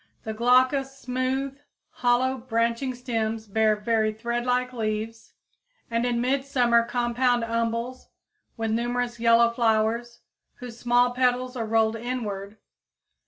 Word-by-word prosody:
The 220 - -4
glaucous, 255 +4 +2
smooth, 265 +2 -2 0.3
hollow, 250 +2 +1
branching 235 +2 -1
stems 225 -3 -3
bear 215 +1 +2
very 215 0 0
threadlike 240 +3 -1
leaves 220 0 -4 0.6
and 230 +1 +1
in 240 -1 0
midsummer 250 -2 +2
compound 245 0 +1
umbels 230 +2 -2 0.5
with 225 -1 -2
numerous 240 +1 -1
yellow 230 0 +5
flowers, 235 0 0 0.3
whose 240 -3 -10
small 245 0 +3
petals 250 0 0
are 230 -3 -3
rolled 225 0 +2
inward. 215 -4 -5
235 Hz, 115 wpm, -25 LUFS, 225-250 Hz, 0.6 s, yellow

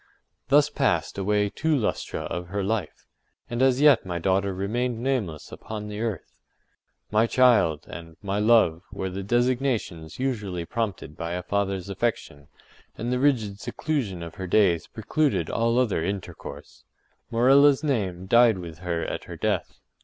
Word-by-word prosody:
Thus 145 +2 +4
passed 95 - 0
away 105 +1 +1
two 160 -1 +1
lustra 115 - -2
of 90 0 -5
her 100 +2 -3
life, 100 -4 -3 0.5
and 120 +1 -1
as 130 0 +3
yet 145 -5 +6
my 90 -2 -4
daughter 95 +3 +1
remained 115 +6 -2
nameless 115 - -2
upon 105 -1 -7
the 105 +1 -5
earth. 115 -5 -4 0.7
“My 110 +2 +3
child,” 105 - +3
and 85 -1 -10
“my 100 0 -2
love,” 105 -7 +4
were 95 -1 -4
the 95 +2 -4
designations 120 - -1
usually 105 -10 -2
prompted 100 -8 -4
by 85 +2 -4
a 90 0 -3
father’s 95 -1 -1
affection, 100 -8 -3 0.5
and 120 +3 -2
the 125 - 0
rigid 115 -8 +1
seclusion 110 - -3
of 85 -1 -8
her 95 - -3
days 90 -4 +3
precluded 110 - -1
all 115 +1 +1
other 115 -10 +1
intercourse. 90 -6 -6 0.5
Morella’s 135 +5 +5
name 95 - -1
died 115 +1 +5
with 85 -3 -8
her 85 -2 -2
at - - -5
her - - -8
death. - - -1
105 Hz, 155 wpm, -25 LUFS, 90-120 Hz, 0.7 s, yet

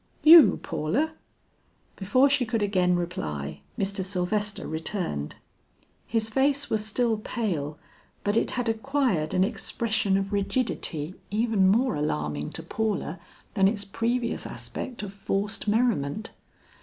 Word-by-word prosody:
"You, 320 -1 +9
Paula?" 265 - -1 0.8
Before 235 +8 +3
she 280 -2 +3
could 225 -2 -1
again 180 -3 +2
reply, 75 - -4 0.2
Mr. 195 0 -1
Sylvester 200 +2 -1
returned. 160 - -3 0.7
His 225 -1 0
face 280 +3 +1
was 215 -1 +1
still 225 +1 +1
pale, 170 - -3 0.5
but 205 +1 +1
it - - +2
had 245 -1 -1
acquired 225 - 0
an 185 - +4
expression 215 -1 0
of 195 +1 -2
rigidity 195 - -1 0.2
even 215 -2 +2
more 235 +7 +3
alarming 75 - -2
to 160 - -6
Paula 195 -2 -2 0.3
than 195 -2 +4
its 205 0 -1
previous 235 +4 -1
aspect 240 -4 -6
of 200 -1 -6
forced 200 +2 -2
merriment. 215 - 0
205 Hz, 125 wpm, -26 LUFS, 180-230 Hz, 0.8 s, You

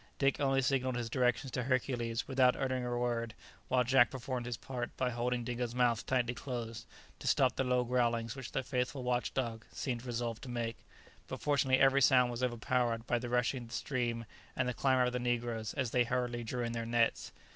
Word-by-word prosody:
Dick 135 0 +2
only 135 -2 +2
signalled 130 -1 +1
his 120 -2 -3
directions 125 0 +1
to 125 - -1
Hercules, 120 -3 -1
without 130 -2 +4
uttering 130 -1 -1
a 120 0 -2
word, 120 -2 -1 0.3
while 125 -1 +3
Jack 125 0 +5
performed 125 -1 -4
his 120 -2 -3
part 125 -2 -5
by 125 -1 0
holding 120 0 -1
Dingo's 120 0 -3
mouth 120 -3 +2
tightly 125 -2 +1
closed, 115 -3 -5 0.3
to - - -6
stop 130 -2 +3
the - - +1
low 125 -1 +2
growlings 120 -2 0
which 135 -3 -7
the 135 - -1
faithful 125 0 -2
watch 125 0 0
dog 115 -4 -2
seemed 120 -3 -3
resolved 120 -2 -3
to 130 - -8
make; 115 -1 -3 0.5
but - - -5
fortunately 135 -2 +2
every 135 +1 +5
sound 125 -2 +5
was 120 +1 -5
overpowered 120 -1 0
by 120 0 +1
the 120 0 -5
rushing 125 +1 +1
of 120 - -9
the - - -5
stream 120 -4 -2 0.3
and 130 - 0
the 125 - 0
clamour 130 +1 +3
of 125 0 0
the 125 - -1
negroes, 120 -2 -1
as 125 -4 -1
they 125 - +4
hurriedly 120 0 -1
drew 120 +2 -3
in 115 - -2
their 115 0 -3
nets. 115 0 +1
125 Hz, 210 wpm, -33 LUFS, 120-130 Hz, 0.5 s, Jack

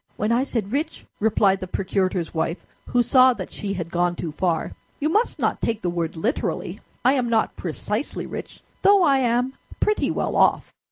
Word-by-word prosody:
"When 210 +2 0
I 235 +2 +3
said 230 -7 -2
rich," 305 +5 -3
replied 205 -2 +3
the 185 - -5
procurator's 185 -2 -1
wife, 165 +1 -2 0.2
who 245 -1 +2
saw 255 0 +6
that - - -7
she 200 -2 -4
had 170 -2 -5
gone 175 0 +1
too 170 -2 -4
far, 170 +1 -1 0.3
"you 305 - +1
must 430 +8 +1
not - - 0
take 225 -1 -1
the 175 - 0
word 170 -1 -2
literally. 230 - -2 0.3
I 255 - +6
am 250 -4 0
not 225 -1 +1
precisely 210 - -3
rich, - - -8 0.2
though 400 -1 +6
I 275 -4 +4
am 250 +1 +1 0.3
pretty 425 0 +1
well - - -1
off." - - +3
215 Hz, 185 wpm, -23 LUFS, 175-255 Hz, 0.3 s, saw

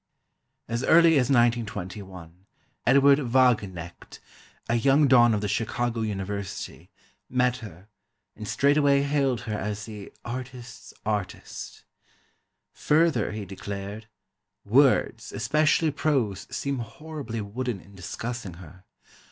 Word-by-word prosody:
As 120 +2 -2
early 165 +2 +6
as 125 0 +1
1921, 100 -7 -1 0.4
Edward 140 +2 +6
Wagenknecht, 115 - 0 0.5
a 115 - 0
young 135 +5 +4
don 120 -3 +6
of 105 - -2
the 105 - -1
Chicago 115 +2 -1
University, 100 -4 -5 0.4
met 125 -1 +2
her, 100 -4 -11 0.5
and 105 - -8
straightway 140 +1 +3
hailed 140 -4 +1
her 115 -3 -5
as 105 0 -3
the 105 -3 -9
"artist's 120 -3 -7
artist." 105 -3 -4 0.9
Further 160 -3 +2
he 105 -1 -5
declared: 100 +2 -7 0.6
"Words, 120 0 +3
especially 155 +5 +2
prose, 130 -10 -1
seem 140 -2 -3
horribly 135 0 -6
wooden 115 +1 -4
in 100 - -17
discussing 100 +1 -6
her.... 90 +2 -14
115 Hz, 110 wpm, -26 LUFS, 100-135 Hz, 0.9 s, early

